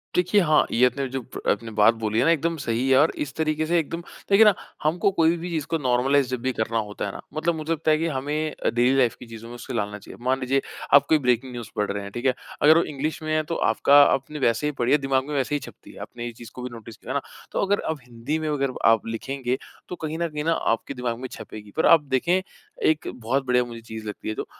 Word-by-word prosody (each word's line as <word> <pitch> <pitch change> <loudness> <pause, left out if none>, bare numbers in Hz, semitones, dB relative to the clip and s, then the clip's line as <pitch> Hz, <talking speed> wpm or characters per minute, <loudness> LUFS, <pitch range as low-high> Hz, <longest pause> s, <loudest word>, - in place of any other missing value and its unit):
देखिए, 180 +3 +3
हाँ, 155 -3 +4
ये 125 +2 +4
आपने 135 +2 0
जो 135 +1 -3
ब - - -9
आपने 115 -1 -1
बात 105 +2 +6
बोली 110 -1 -1
है 125 - +3
ना, 165 - +5
एकदम 165 +1 +1
सही 120 0 -1
है 130 - +6
और 150 +3 +5
इस 140 -1 -8
तरीके 155 0 0
से 170 +2 +2
एकदम 165 +2 -4 0.3
देखिए 200 +2 +7
ना, 210 - +7 0.3
हमको 165 +5 +2
कोई 165 -1 +3
भी 175 +2 -5
चीज़ 155 -4 -2
को 165 - +1
नॉर्मलाइज़ 135 0 +2
जब 130 -2 -3
भी 130 +1 0
करना 115 0 -1
होता 105 -2 -3
है 100 - -3
ना, - - -9
मतलब 165 +2 0
मुझे 155 +1 -4
लगता 160 0 +1
है 155 - +4
कि 165 +1 -1
हमें 150 +2 -2
अ, - - -2
डेली 125 +3 +2
लाइफ़ 125 -4 +3
की - - -10
चीज़ों 115 0 -10
में 120 - -8
उसको 125 +1 -8
ढालना 105 -2 -2
चाहिए। - - -12
मान 130 +1 +2
लीजिए, 135 +1 +1 0.3
आप 140 - +8
कोई 160 - +6
ब्रेकिंग 125 -1 +1
न्यूज़ 120 -2 -7
पढ़ 105 -2 0
रहे 100 0 -4
हैं। 100 - -8
ठीक 120 +4 -6
है? 130 - +4 0.3
अगर 155 +2 +7
वो 170 - +4
इंग्लिश 150 +2 -4
में 155 - -3
है, 155 - +1
तो 165 +2 -4
आपका 145 -2 +5
आपने 140 +2 0
वैसे 125 +3 +1
ही 150 - 0
पढ़ी 120 +1 +1
है, 150 - +6
दिमाग 135 0 0
में 150 - -4
वैसे 135 +2 0
ही 145 - 0
छपती - - -12
है। - - -13
आपने 120 0 -7
ये 120 - -4
चीज़ 120 - -10
को 125 - -7
भी 125 - -4
नोटिस 115 -1 -10
किया - - -6
ना, - - 0 0.3
तो - - -1
अगर 200 +1 +1
अब 160 -2 -2
हिंदी 125 +6 -3
में 155 - -3
अगर 140 -3 0
आप 115 -1 +4
लिखेंगे, 130 +2 -3 0.3
तो 180 - -4
कहीं 160 -1 -4
न 170 - 0
कहीं 150 -1 -4
न - - +1 0.2
आपके 115 - -4
दिमाग 125 -3 -3
में 130 - -5
छपेगी। 105 -1 -10
पर 160 - +3
आप 165 - +7
देखें, 175 +8 +2 0.4
एक 155 -1 +2
बहुत 130 +3 -1
बढ़िया 125 -1 +3
मुझे 115 -1 -9
चीज़ 110 -1 -8
लगती 105 - -5
है 110 - -1
जो - - -4
135 Hz, 275 wpm, -24 LUFS, 120-155 Hz, 0.4 s, आप